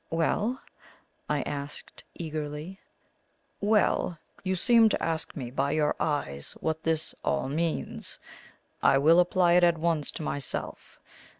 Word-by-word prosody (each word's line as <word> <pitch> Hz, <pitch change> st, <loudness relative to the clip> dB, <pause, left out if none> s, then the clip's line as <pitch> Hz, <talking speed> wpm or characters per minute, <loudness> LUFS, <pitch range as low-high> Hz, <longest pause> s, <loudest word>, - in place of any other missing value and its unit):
"Well?" 205 Hz, +9 st, 0 dB, 0.7 s
I 145 Hz, -3 st, +1 dB
asked 145 Hz, 0 st, -6 dB
eagerly. 155 Hz, +3 st, -5 dB, 0.8 s
"Well, 205 Hz, -4 st, +2 dB, 0.3 s
you 190 Hz, 0 st, 0 dB
seem 230 Hz, +3 st, +5 dB
to -, -, -1 dB
ask 165 Hz, -1 st, -2 dB
me 125 Hz, -5 st, -5 dB
by 140 Hz, +2 st, 0 dB
your 155 Hz, -1 st, +1 dB
eyes 70 Hz, -, -2 dB
what 160 Hz, 0 st, -2 dB
this 160 Hz, -1 st, -1 dB
all -, -, 0 dB
means. 160 Hz, +4 st, -3 dB, 0.6 s
I 135 Hz, -, +5 dB
will 160 Hz, +5 st, +6 dB
apply 180 Hz, 0 st, +4 dB
it 180 Hz, 0 st, +5 dB
at 170 Hz, -1 st, +4 dB
once 160 Hz, -2 st, 0 dB
to -, -, -5 dB
myself. 140 Hz, -2 st, -5 dB
160 Hz, 130 wpm, -28 LUFS, 145-175 Hz, 0.8 s, will